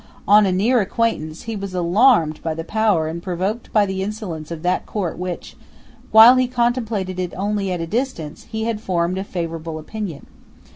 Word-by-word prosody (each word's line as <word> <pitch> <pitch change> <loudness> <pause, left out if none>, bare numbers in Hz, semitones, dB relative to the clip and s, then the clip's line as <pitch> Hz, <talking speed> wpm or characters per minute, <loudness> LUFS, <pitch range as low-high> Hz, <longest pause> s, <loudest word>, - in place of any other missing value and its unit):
On 205 0 +6
a - - +1
near 220 +7 +3
acquaintance, 190 -7 -2
he 225 -1 -4
was 195 -2 -5
alarmed 175 - +3
by 160 -1 -2
the 165 - -4
power 210 -4 +1
and 165 +2 -5
provoked 190 +6 -3
by 210 -2 +4
the 190 -1 -3
insolence 190 -7 -5
of 165 -1 -7
that 180 +1 0
Court 190 -6 -2
of - - -12
which, 180 -1 -5 0.5
while 225 +4 +9
he 255 0 +2
contemplated 230 -6 -1
it 180 -2 -3
only 200 0 -1
at 175 -2 -2
a - - -2
distance, 205 - -4
he 220 0 -3
had 225 -2 -2
formed 180 -2 -1
a - - -2
favourable 165 -4 -5
opinion. 170 -1 -6
190 Hz, 190 wpm, -21 LUFS, 170-220 Hz, 0.5 s, while